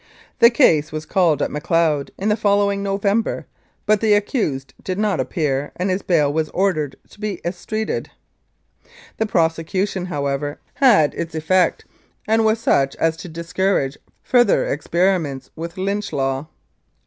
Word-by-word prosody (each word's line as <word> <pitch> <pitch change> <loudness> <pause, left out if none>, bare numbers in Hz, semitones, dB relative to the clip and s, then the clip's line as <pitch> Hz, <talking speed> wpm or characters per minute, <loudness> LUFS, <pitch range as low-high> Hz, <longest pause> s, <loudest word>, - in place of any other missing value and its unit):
The 235 -1 +8
case 160 - +3
was 155 0 -5
called 170 -7 +2
at - - -2
Macleod 150 -1 +1
in 200 +3 -1
the 210 - +3
following 200 -1 +1
November, 200 +3 0 0.4
but 210 -1 +3
the 215 -2 +4
accused 200 - -1
did 185 -1 -3
not 210 -3 0
appear, 145 -3 -1
and 185 +2 -1
his 185 +2 -1
bail 150 -5 +2
was 155 0 0
ordered 175 -7 0 0.2
to - - -17
be 210 -4 -3
estreated. 215 +5 -3 1.1
The 220 - 0
prosecution, 180 +2 0
however, 145 -2 -2 0.2
had 210 - +4
its 165 -1 -5
effect, 180 +4 +1 0.4
and 220 +1 +3
was 220 +1 +3
such 135 -11 +2
as 165 0 +1
to 175 - -9
discourage 170 -3 -1 0.2
further 240 -4 +3
experiments 165 -2 -1
with 170 +2 -7
Lynch 200 +2 -2
Law. 135 +1 -1
180 Hz, 145 wpm, -20 LUFS, 155-205 Hz, 1.1 s, The